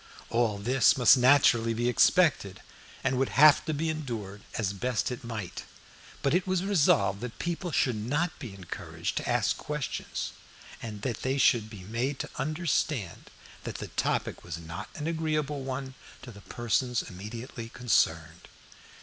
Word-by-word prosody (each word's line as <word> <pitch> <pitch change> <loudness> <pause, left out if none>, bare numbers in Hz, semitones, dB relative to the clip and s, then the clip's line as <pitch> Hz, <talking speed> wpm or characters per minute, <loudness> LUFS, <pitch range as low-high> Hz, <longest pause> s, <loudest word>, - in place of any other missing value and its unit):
All 115 -3 +1
this 120 +5 +3
must 125 0 +7
naturally 125 -3 +4
be 120 +2 0
expected, 125 - +3 0.4
and 130 -1 +1
would 135 - +1
have 150 +1 +8
to 155 - -1
be 155 +2 -1
endured 115 -11 -4
as 100 -3 -1
best 125 +5 -1
it 125 +2 -6
might; 105 -6 -5 0.6
but 140 - +2
it 180 +2 +1
was 185 -1 +1
resolved 105 - +3
that 125 -1 -6
people 175 +1 -3
should 125 -4 +2
not 145 +11 -1
be 115 -9 -8
encouraged 90 -3 -5
to - - -2
ask - - +1
questions, 150 -2 -4 0.5
and 105 -3 -7
that 120 -5 -2
they 130 +1 0
should 115 -5 +3
be 105 -4 -10
made 120 +7 -2
to - - -5
understand 145 - -1 0.3
that - - -5
the - - -6
topic - - -1
was 85 -1 -6
not 80 +1 -7
an 150 - -5
agreeable 155 -3 -1
one 130 0 -4 0.3
to 125 - -9
the 100 -2 -13
persons 120 +3 -1
immediately 115 +4 -8
concerned. 85 -10 0
125 Hz, 160 wpm, -29 LUFS, 105-145 Hz, 0.6 s, have